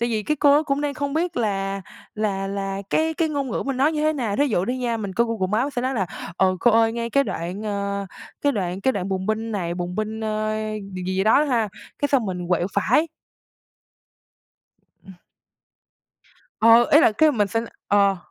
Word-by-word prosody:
tại 235 - +1
vì 220 -2 -1
cái 300 +7 -1
cô 285 0 +5
đó 305 - +3
cũng 280 -2 -1
đang 290 -1 -2
không 280 +1 -3
biết 345 +1 -1
là 195 -3 -1 0.3
là 200 -2 -1
là 195 0 -3
cái 320 0 +1
cái 325 -1 0
ngôn 280 -3 -2
ngữ - - -2
mình 275 -2 -1
nói 290 +4 +3
như 300 - -2
thế 310 0 +3
nào, 230 -8 -2
thí 290 - +3
dụ 200 -8 0
đi 255 +3 -2
nha, 240 -2 -1
mình 200 -4 -5
coi 235 +4 +2
Google 220 -5 -1 0.2
Maps 285 +1 -3
sẽ 245 - 0
nói 260 +1 -1
là: 195 -6 0 0.3
"Ờ, 185 0 +2
cô 240 - +5
ơi, 225 0 +4
ngay 235 0 -3
cái 275 +2 +3
đoạn, 180 +1 -4
ờ, 200 -1 -3 0.3
cái 285 - +2
đoạn 185 -4 -3
cái 265 +6 +2
đoạn 195 -3 -3
bùng 190 0 -2
binh 220 +1 -2
này, 175 -4 -2
bùng 175 0 -4
binh, 215 +2 -3
ơ, 215 0 -1 0.4
gì 185 - -5
gì 185 +1 0
đó 225 +7 +5
ha, 235 -7 +1 0.3
cái 285 - 0
xong 255 -7 +2
mình 180 -2 -4
quẹo 175 -1 +1
phải." 300 - +3 2.0
Ừm. 190 - -12 1.5
Ờ, 230 +1 +7
ý 300 - +8
là 275 - +5
cái 305 +8 +4
mình 210 -6 +1
sẽ 225 +4 -1 0.3
ờ. 200 -1 +3
220 Hz, 215 wpm, -23 LUFS, 195-275 Hz, 2.0 s, ý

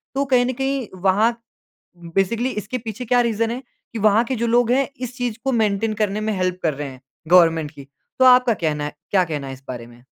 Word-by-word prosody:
तो 280 +1 +1
कहीं 255 -2 +3
न 255 - -1
कहीं 270 -2 -2
वहाँ 200 +4 +3 0.7
उम, 170 -1 -12
बेसिकली 230 +6 +1
इसके 215 +3 -4
पीछे 225 +1 -6
क्या 245 +1 +3
रीज़न 230 -1 0
है 250 +3 -4 0.3
कि 230 - -4
वहाँ 215 +2 +4
के 255 +1 -3
जो 235 - -1
लोग 240 0 +3
हैं, 270 +1 +2
इस 250 0 -5
चीज़ 240 -3 -2
को 270 - +1
मेंटेन 215 -1 +1
करने 210 0 0
में 215 0 -1
हेल्प 185 0 -1
कर 155 -3 +1
रहे 145 0 -5
हैं 130 -1 -12 0.3
गवर्नमेंट 165 -4 +4
की, 140 -2 -12 0.3
तो 260 - +5
आपका 250 -2 +6
कहना 150 -5 -2
है 150 - -5 0.2
क्या 190 -2 +3
कहना 150 -4 -4
है 135 - -6
इस 130 0 -11
बारे 120 -2 -6
में? 120 +1 -18
215 Hz, 235 wpm, -21 LUFS, 170-245 Hz, 0.7 s, आपका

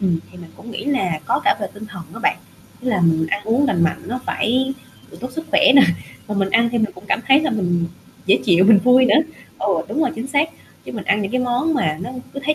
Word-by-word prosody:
Ừm, 180 -4 +1
thì 180 - -13
mình 170 -2 -12
cũng 235 - -11
nghĩ - - -6
là 190 - -1
có - - +1
cả - - +3
về 200 - -2
tinh 210 +1 -9
thần 195 -4 -9
đó 225 - -9
bạn, - - +2 0.4
ý 255 - -4
là 205 -6 +1
mình 160 -2 +2
ăn - - 0
uống 240 +6 +2
lành 175 -9 +1
mạnh 160 - -1
nó 250 +3 -4
phải 260 +4 0 0.5
tốt 255 - -5
sức 320 +4 -5
khỏe 300 - +3
nè, 275 - +9 0.5
mà 210 - -3
mình 195 -1 0
ăn 230 +2 +3
thì 235 - 0
mình 220 -1 0
cũng 180 - -14
cảm - - +1
thấy 270 +2 +6
là 315 - -1
mình 175 -6 0 0.4
dễ 190 - +4
chịu 180 -1 +4
mình 210 0 +7
vui 255 +1 +6
nữa. - - +4 0.4
Ờ, - - -2 0.2
đúng - - -2
rồi, 320 - +2
chính 230 +3 -5
xác, 295 +3 +1 0.3
chứ - - -8
mình 215 - -6
ăn 210 +2 +1
những 195 - -4
cái 255 - +1
món 250 +6 0
mà 155 - 0
nó 210 - -6 0.2
cứ 275 - -5
thấy 305 +1 +2
225 Hz, 270 wpm, -20 LUFS, 190-260 Hz, 0.5 s, nè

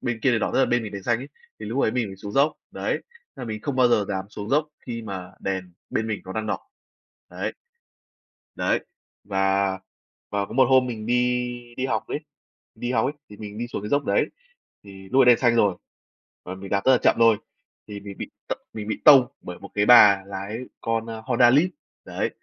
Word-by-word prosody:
bên 120 -3 -3
kia 135 - +4
đèn 115 - +1
đỏ - - 0
tức - - +1
là 135 - +4
bên 120 0 +1
mình 105 -2 -7
đèn 100 - -6
xanh 120 +3 +1
ấy, 135 +3 -8 0.3
thì - - -6
lúc 135 - -1
đấy - - +3
mình 125 -3 0
mới 95 -1 -9
xuống 100 +1 -8
dốc, 140 +5 +3 0.2
đấy, - - -2
nên - - -3 0.3
là - - -6
mình 110 -2 -5
không 140 -2 -3
bao 125 -1 +5
giờ 105 -4 +3
dám 95 -2 -2
xuống 105 0 -7
dốc 150 +2 +2 0.2
khi 115 -2 -4
mà 95 -4 -7
đèn 95 -2 -3 0.2
bên 110 - -1
mình 110 -2 -3
nó 95 - -7
đang 110 +2 -3
đỏ, - - -1 0.7
đấy. - - -3 1.0
Đấy, - - +1 0.4
và 95 0 +1 0.6
và 100 -1 -1
có - - -10
một 130 0 +5
hôm 130 -1 +5
mình 110 -3 -5
đi 125 0 -1
đi 130 - -1
học - - -2
ấy - - -3 0.6
đi 120 +2 -3
học 115 -1 +2
ấy, 140 - -1 0.2
thì 105 - -12
mình 105 -1 -8
đi 120 +1 -3
xuống 110 - -5
cái 105 - -5
dốc 145 +3 +1
đấy, - - +2 0.6
thì 95 -1 -12
lúc 135 - +5
ấy - - +5
đen 120 -1 +7
xanh 120 -2 +3
rồi, 100 -5 +3 0.7
và 90 +1 -6
mình 95 +1 -9
đạp 100 0 +1
rất 130 - +6
là 125 - +6
chậm - - +5
thôi, 115 -2 +6 0.5
thì 105 -1 -7
mình 100 -1 -9
bị - - -6 0.2
t - - 0 0.2
mình 105 -1 -6
bị 110 - -3
tông 135 -4 +9
bởi 90 0 -8
một - - -10
cái 105 0 +2
bà 100 -5 +8
lái 100 +2 -5 0.2
con, 115 0 -1
ơ, 115 -1 -7
Honda 120 -1 +5
Lead, 150 +8 +5 0.4
đấy, - - -2
110 Hz, 235 wpm, -24 LUFS, 100-125 Hz, 1.0 s, tông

